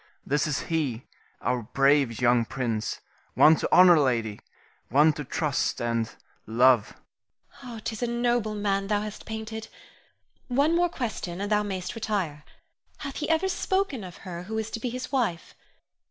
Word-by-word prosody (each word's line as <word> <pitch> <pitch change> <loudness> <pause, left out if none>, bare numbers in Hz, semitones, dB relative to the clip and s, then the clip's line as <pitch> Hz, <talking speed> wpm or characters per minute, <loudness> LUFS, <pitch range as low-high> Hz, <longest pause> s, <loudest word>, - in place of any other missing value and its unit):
This 145 +2 +1
is 145 -2 -1
he, 145 -8 -2 0.4
our 125 +1 0
brave 135 +1 +2
young 120 -1 +4
prince; 115 -3 -3 0.3
one 155 +1 +7
to - - -2
honor, 180 -2 +8
lady; 115 -6 0 0.5
one 150 +5 +5
to 150 - -5
trust 145 +1 -1
and 115 -1 -1 0.4
love. 120 0 +4 0.7
Irene. 235 -3 -8
'Tis 220 +1 -5
a 240 - +1
noble 235 -2 0
man 200 -1 0
thou 205 0 +1
hast 215 0 -7
painted. 220 0 -5 0.8
One 280 +6 +2
more 350 0 +3
question 215 - -4
and 200 +1 -3
thou 210 0 +4
mayst 190 -3 -4
retire. 195 -10 -2 0.5
Hath 280 -2 -6
he 300 - -3
ever 325 +4 +2
spoken 380 - -1
of 180 -2 -9
her 175 -2 -6
who 220 +3 -4
is 220 0 -3
to 230 - -4
be 245 - -2
his 255 +2 -6
wife? 230 - -1
185 Hz, 160 wpm, -27 LUFS, 135-225 Hz, 0.8 s, honor